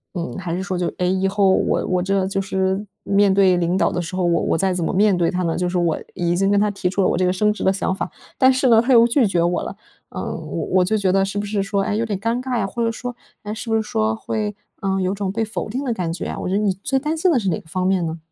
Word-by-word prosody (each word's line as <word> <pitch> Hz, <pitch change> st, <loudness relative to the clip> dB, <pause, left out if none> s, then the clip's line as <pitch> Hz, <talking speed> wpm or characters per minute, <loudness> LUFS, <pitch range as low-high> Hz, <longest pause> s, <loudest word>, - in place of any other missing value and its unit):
嗯， 170 Hz, -1 st, -4 dB
还 175 Hz, -2 st, -3 dB
是 190 Hz, -, -3 dB
说 190 Hz, -1 st, -3 dB
就， 175 Hz, -, 0 dB
诶， 180 Hz, 0 st, +1 dB
以 190 Hz, 0 st, +1 dB
后 195 Hz, 0 st, +2 dB
我 -, -, +1 dB
我 180 Hz, -1 st, 0 dB
这 195 Hz, 0 st, +1 dB
就 195 Hz, 0 st, -1 dB
是 190 Hz, +1 st, -1 dB, 0.2 s
面 200 Hz, 0 st, +3 dB
对 190 Hz, -2 st, +4 dB
领 175 Hz, +2 st, +1 dB
导 -, -, +2 dB
的 180 Hz, -, -2 dB
时 175 Hz, +2 st, -6 dB
候， 185 Hz, -, 0 dB
我 170 Hz, -1 st, +2 dB
我 -, -, +1 dB
再 190 Hz, 0 st, +1 dB
怎 175 Hz, -2 st, -2 dB
么 -, -, 0 dB
面 200 Hz, 0 st, +4 dB
对 170 Hz, -1 st, +1 dB
他 180 Hz, 0 st, -1 dB
呢？ 165 Hz, -1 st, 0 dB
就 180 Hz, 0 st, -1 dB
是 180 Hz, -, -1 dB
我 170 Hz, -3 st, +1 dB, 0.2 s
已 175 Hz, 0 st, 0 dB
经 195 Hz, +2 st, +2 dB
跟 200 Hz, 0 st, +3 dB
他 210 Hz, 0 st, +2 dB
提 185 Hz, -2 st, -2 dB
出 195 Hz, +1 st, -1 dB
了 -, -, +3 dB
我 -, -, +1 dB
这 185 Hz, -, +1 dB
个 180 Hz, -, +2 dB
升 210 Hz, +3 st, +2 dB
职 -, -, -6 dB
的 190 Hz, -, +4 dB
想 190 Hz, -1 st, -1 dB
法， -, -, -4 dB, 0.3 s
但 260 Hz, 0 st, +6 dB
是 260 Hz, 0 st, +1 dB
呢， 225 Hz, -1 st, +6 dB
他 255 Hz, +2 st, +2 dB
又 230 Hz, 0 st, +7 dB
拒 240 Hz, -1 st, +3 dB
绝 175 Hz, -3 st, +1 dB
我 175 Hz, 0 st, +1 dB
了， -, -, -6 dB, 0.3 s
呃， -, -, -6 dB
我 85 Hz, -, -4 dB
我 180 Hz, -, +5 dB
就 220 Hz, +3 st, +1 dB
觉 190 Hz, -3 st, +1 dB
得 195 Hz, 0 st, +3 dB
是 195 Hz, +1 st, -3 dB
不 205 Hz, -, -1 dB
是 205 Hz, -1 st, -1 dB
说， 195 Hz, 0 st, 0 dB
哎， 205 Hz, -, -1 dB
有 225 Hz, -, 0 dB
点 205 Hz, -3 st, -3 dB
尴 230 Hz, +4 st, -1 dB
尬 255 Hz, -2 st, -2 dB
呀， 195 Hz, -, 0 dB
或 235 Hz, +4 st, -3 dB
者 230 Hz, -, +1 dB
说， 245 Hz, +1 st, -6 dB, 0.3 s
哎， 210 Hz, +1 st, -4 dB
是 225 Hz, +1 st, -6 dB
不 225 Hz, -, +2 dB
是 220 Hz, -, +2 dB
说 110 Hz, -, 0 dB
会， 210 Hz, -, -3 dB, 0.3 s
呃， 195 Hz, -1 st, 0 dB
有 185 Hz, +1 st, 0 dB
种 195 Hz, -2 st, -2 dB
被 225 Hz, +2 st, -1 dB
否 215 Hz, -, -5 dB
定 260 Hz, +6 st, -3 dB
的 245 Hz, -4 st, -1 dB
感 175 Hz, -5 st, -2 dB
觉 170 Hz, -, -5 dB
啊？ -, -, -4 dB
我 -, -, -4 dB
觉 190 Hz, -, 0 dB
得 -, -, +2 dB
你 200 Hz, -3 st, +2 dB
最 270 Hz, -, +1 dB
担 305 Hz, +4 st, -1 dB
心 355 Hz, +3 st, +2 dB
的 260 Hz, -, +3 dB
是 195 Hz, -3 st, -1 dB
哪 160 Hz, -, -1 dB
个 -, -, -19 dB
方 185 Hz, +1 st, -2 dB
面 190 Hz, -2 st, +2 dB
呢？ 160 Hz, 0 st, -3 dB
195 Hz, 345 characters per minute, -21 LUFS, 180-215 Hz, 0.3 s, 又